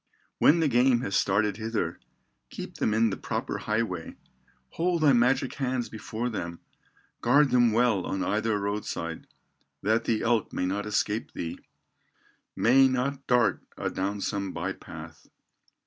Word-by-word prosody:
"When 165 +3 +5
the 160 - +3
game 125 -1 +3
has 100 -5 -2
started 100 +1 +2
hither, 110 -7 -2 0.5
Keep - - -8
them - - +1
in 110 +1 +3
the - - -3
proper - - -3
highway, 105 -6 -2 0.5
Hold 170 -1 0
thy 145 -3 +6
magic 125 +2 +2
hands 130 -3 -2
before 110 +2 -4
them, 85 -7 -4 0.6
Guard 140 +4 +4
them 120 -2 +4
well 115 -5 +2
on 95 - -2
either 110 +1 0
road 100 +1 -2
side, 85 0 -5 0.6
That 110 +3 +2
the 110 -2 0
elk 115 -1 +1
may - - -1
not 100 +3 -2
escape 105 +1 -1
thee, 80 - -5 1.0
May 135 +3 +5
not 130 +2 -2
dart 125 -1 +3 0.2
adown 100 +2 -2
some 100 -1 -2
by - - -3
path. - - -11
110 Hz, 145 wpm, -27 LUFS, 100-125 Hz, 1.0 s, thy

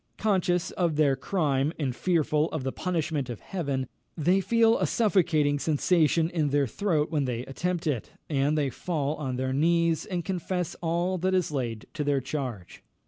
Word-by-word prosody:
Conscious 180 -4 +1
of 170 -4 0
their 145 -3 +3
crime, 145 -1 0
and 135 -5 -2
fearful 155 -2 +1
of 155 -4 -4
the 130 - -1
punishment 160 -7 -2
of 120 - -5
Heaven, 140 -8 -2 0.3
they 180 +5 +3
feel 230 +2 +3
a - - +1
suffocating 165 -9 +2
sensation 160 +1 +2
in 155 -4 0
their 140 0 +2
throat 155 - 0
when 150 -4 +1
they 125 -1 -3
attempt 175 +5 -2
it, 140 -8 -1 0.2
and 145 +1 +1
they 140 -3 +1
fall 150 0 -2
on 130 -4 -3
their 130 +1 -1
knees, 165 +2 +2
and 175 -3 -3
confess 180 -2 -2
all 175 +2 0
that 185 +2 +1
is 180 -4 +1
laid 120 -6 -3
to 150 - -2
their 145 -1 +2
charge. 130 - -5
155 Hz, 175 wpm, -27 LUFS, 140-175 Hz, 0.3 s, their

